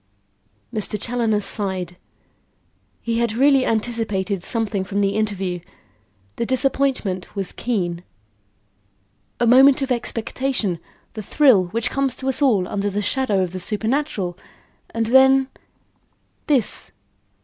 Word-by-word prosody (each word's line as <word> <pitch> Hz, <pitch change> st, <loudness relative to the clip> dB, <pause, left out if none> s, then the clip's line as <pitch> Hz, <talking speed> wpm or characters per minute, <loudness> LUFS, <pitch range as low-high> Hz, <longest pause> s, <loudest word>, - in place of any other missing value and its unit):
Mr. 210 Hz, 0 st, -1 dB
Challoner 225 Hz, -2 st, 0 dB
sighed; 190 Hz, -3 st, -1 dB, 1.1 s
he 230 Hz, 0 st, -1 dB
had 235 Hz, -2 st, 0 dB
really 270 Hz, +2 st, +3 dB
anticipated 215 Hz, -4 st, -1 dB
something 215 Hz, -1 st, -2 dB
from 200 Hz, +1 st, -3 dB
the 200 Hz, -1 st, +2 dB
interview. 195 Hz, -4 st, -2 dB, 0.8 s
The 235 Hz, -, -1 dB
disappointment 260 Hz, -8 st, 0 dB
was 195 Hz, -2 st, -3 dB
keen. 180 Hz, -8 st, -2 dB, 1.4 s
A 240 Hz, -, +2 dB
moment 265 Hz, +3 st, +6 dB
of 265 Hz, -, -3 dB
expectation; 235 Hz, -4 st, -1 dB, 0.3 s
the 215 Hz, -, -6 dB
thrill 230 Hz, -3 st, +4 dB
which 225 Hz, +6 st, -2 dB
comes 270 Hz, -2 st, 0 dB
to 265 Hz, -, -6 dB
us 265 Hz, -, 0 dB
all 215 Hz, -10 st, +3 dB
under 205 Hz, 0 st, -2 dB
the 205 Hz, +1 st, -2 dB
shadow 205 Hz, -3 st, +1 dB
of 180 Hz, -, -4 dB
the 185 Hz, -, -5 dB
supernatural, 210 Hz, -, -2 dB, 0.5 s
and 230 Hz, 0 st, -2 dB
then 265 Hz, +2 st, +5 dB, 1.0 s
this! 270 Hz, -8 st, 0 dB
220 Hz, 120 wpm, -21 LUFS, 195-260 Hz, 1.4 s, moment